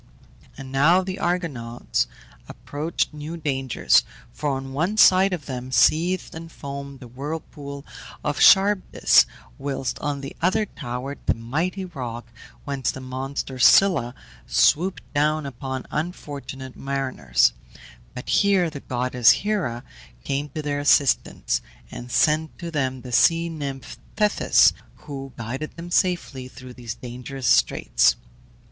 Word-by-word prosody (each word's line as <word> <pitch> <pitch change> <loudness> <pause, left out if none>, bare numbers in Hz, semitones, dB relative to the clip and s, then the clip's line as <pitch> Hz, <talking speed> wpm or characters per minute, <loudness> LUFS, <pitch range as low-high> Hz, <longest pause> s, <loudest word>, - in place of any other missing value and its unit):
And 135 -1 -9
now 160 +7 +4
the 185 0 -5
Argonauts 145 -10 -1 0.4
approached 155 +2 -3
new 150 +3 -6
dangers, 135 -5 +2 0.3
for 150 - -2
on 135 -1 -4
one 170 +10 -1
side 190 -1 +6
of 170 -6 -4
them 130 -1 -6
seethed 175 +7 +2
and 165 0 -9
foamed 140 -2 -7
the 125 - -9
whirlpool 140 +1 -7 0.4
of 145 - -2
Charybdis, 195 0 +5 0.3
whilst 135 -2 -3
on 145 -2 -3
the 135 - -8
other 190 +5 +2
towered 125 -4 -6
the - - +3
mighty 160 +12 -2
rock 120 -8 -7 0.3
whence 140 -3 -2
the - - -4
monster 130 0 -5
Scylla 130 -5 +5 0.3
swooped 180 +5 +2
down 150 +1 +1
upon 130 0 -5
unfortunate 140 -5 -5
mariners; 135 - +1 0.6
but 125 - -7
here 195 -5 +3
the 145 - -7
goddess 125 -2 +2
Hera 180 - +1 0.4
came 140 +2 -2
to 155 - -3
their 145 -1 -1
assistance, 145 -2 +2 0.3
and 120 - -8
sent 155 +3 +2
to 170 -1 -6
them 130 -4 -1
the 125 - -9
sea 165 +7 +4
nymph 140 -4 -6 0.2
Thetis, 210 -1 +4 0.3
who 135 -2 -7
guided 130 +7 -5
them 170 +1 -8
safely 170 -8 0
through 130 -1 -12
these 120 -2 -7
dangerous 125 +2 -7
straits. - - +3
140 Hz, 130 wpm, -23 LUFS, 130-165 Hz, 0.6 s, side